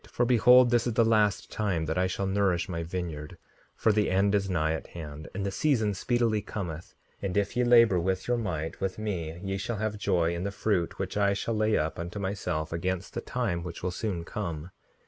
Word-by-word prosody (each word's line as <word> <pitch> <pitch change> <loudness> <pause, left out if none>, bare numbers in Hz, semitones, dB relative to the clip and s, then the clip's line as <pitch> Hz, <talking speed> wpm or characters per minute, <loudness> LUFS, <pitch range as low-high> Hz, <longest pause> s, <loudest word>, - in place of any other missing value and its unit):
For 120 - +1
behold, 125 +1 +6
this 120 0 +3
is 120 - 0
the 115 - +4
last 110 -3 +2
time 95 -7 -1
that 80 +1 -2
I 90 0 +2
shall 95 +1 -2
nourish 95 -3 +1
my 85 -2 -3
vineyard; 80 -3 -5 0.4
for 110 - +3
the 105 0 +2
end 100 +2 +2
is 100 -1 +1
nigh 80 -3 +1
at 80 - -5
hand, 75 -3 -8
and 100 - -2
the 100 - -1
season 110 -4 +1
speedily 115 +1 +1
cometh; 85 -7 -6 0.3
and 100 -1 -2
if 100 +2 0
ye 125 - +2
labor 115 -6 +6
with 95 +2 -1
your 120 0 +2
might 80 -8 -3
with 95 -1 -2
me 85 -7 -4
ye 95 0 -2
shall 110 +3 -3
have 105 0 -2
joy 85 -4 +1
in 85 +1 -3
the 100 - -1
fruit 100 -4 -1
which - - -3
I 100 -1 +3
shall 115 +3 -2
lay 110 0 +2
up 80 +2 -2
unto 85 +3 -5
myself 90 -5 -2
against 95 +2 -2
the 120 - -3
time 115 -11 -2
which 85 0 -7
will 90 - 0
soon 90 -3 -3
come. 85 -3 -5
95 Hz, 220 wpm, -28 LUFS, 85-110 Hz, 0.4 s, behold